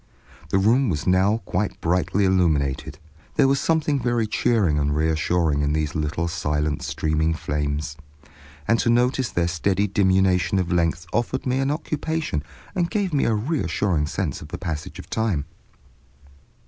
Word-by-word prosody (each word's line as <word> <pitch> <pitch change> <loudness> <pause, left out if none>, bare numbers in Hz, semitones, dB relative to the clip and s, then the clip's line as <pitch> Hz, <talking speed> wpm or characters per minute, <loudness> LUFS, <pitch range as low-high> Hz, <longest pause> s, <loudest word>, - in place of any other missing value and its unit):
The 95 - +2
room 115 +6 +3
was 80 -3 -2
now 95 +5 +2
quite 95 +3 -2
brightly 90 +3 +1
illuminated. 75 -7 +1 0.4
There - - +4
was 135 0 +2
something 155 -2 +1
very 120 -2 +1
cheering 105 -8 +1
and 75 0 0
reassuring 80 0 +1
in 75 0 +1
these 75 -1 -1
little 80 +2 -1
silent 75 -3 -1
streaming 80 +1 0
flames, 75 0 -3 0.7
and 115 +1 +3
to - - +1
notice 125 +1 +2
their 85 -1 0
steady 95 +3 +1
diminution 95 -1 +2
of 90 -1 -1
length 85 -1 +1
offered 120 +3 -1
me 130 0 +1
an 135 0 +1
occupation 155 - -2 0.3
and 175 -2 0
gave 200 -6 -1
me 140 - +2
a 115 - +2
reassuring 100 - 0
sense 80 -4 -3
of - - -9
the - - -6
passage 80 -1 -5
of - - -9
time. 105 -10 -1
90 Hz, 155 wpm, -23 LUFS, 80-115 Hz, 0.7 s, There